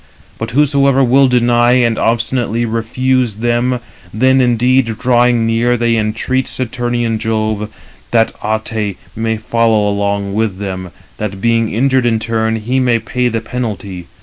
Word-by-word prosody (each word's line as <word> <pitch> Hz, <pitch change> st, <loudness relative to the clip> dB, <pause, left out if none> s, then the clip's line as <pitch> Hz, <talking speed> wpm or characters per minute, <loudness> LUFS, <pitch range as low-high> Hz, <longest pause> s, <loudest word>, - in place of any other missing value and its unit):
But 110 Hz, -, -3 dB
whosoever 140 Hz, 0 st, +3 dB
will 135 Hz, +2 st, +4 dB
deny 120 Hz, -1 st, +3 dB
and 120 Hz, -2 st, +2 dB
obstinately 115 Hz, +1 st, 0 dB
refuse 120 Hz, +1 st, 0 dB
them, 120 Hz, +2 st, 0 dB, 0.3 s
then 130 Hz, +4 st, +3 dB
indeed, 120 Hz, -1 st, +2 dB
drawing 120 Hz, -1 st, +2 dB
near, 115 Hz, +2 st, +1 dB
they 115 Hz, 0 st, +1 dB
entreat 115 Hz, +4 st, -1 dB
Saturnian 120 Hz, -2 st, -2 dB
Jove, 110 Hz, -1 st, -2 dB, 0.4 s
that 115 Hz, -1 st, +2 dB
Ate 110 Hz, -2 st, -2 dB, 0.2 s
may 110 Hz, 0 st, -1 dB
follow 110 Hz, -1 st, +1 dB
along 100 Hz, -1 st, -1 dB
with 105 Hz, -3 st, -1 dB
him, 95 Hz, -2 st, -5 dB, 0.3 s
that 100 Hz, -2 st, -4 dB
being 115 Hz, +1 st, +1 dB
injured 130 Hz, +2 st, +2 dB
[in 115 Hz, -1 st, +2 dB
turn], 110 Hz, 0 st, -1 dB
he 120 Hz, +4 st, -1 dB
may 125 Hz, -2 st, +2 dB
pay 125 Hz, +2 st, -2 dB
the 115 Hz, -1 st, -2 dB
penalty. 105 Hz, -7 st, -5 dB
115 Hz, 140 wpm, -15 LUFS, 110-125 Hz, 0.4 s, will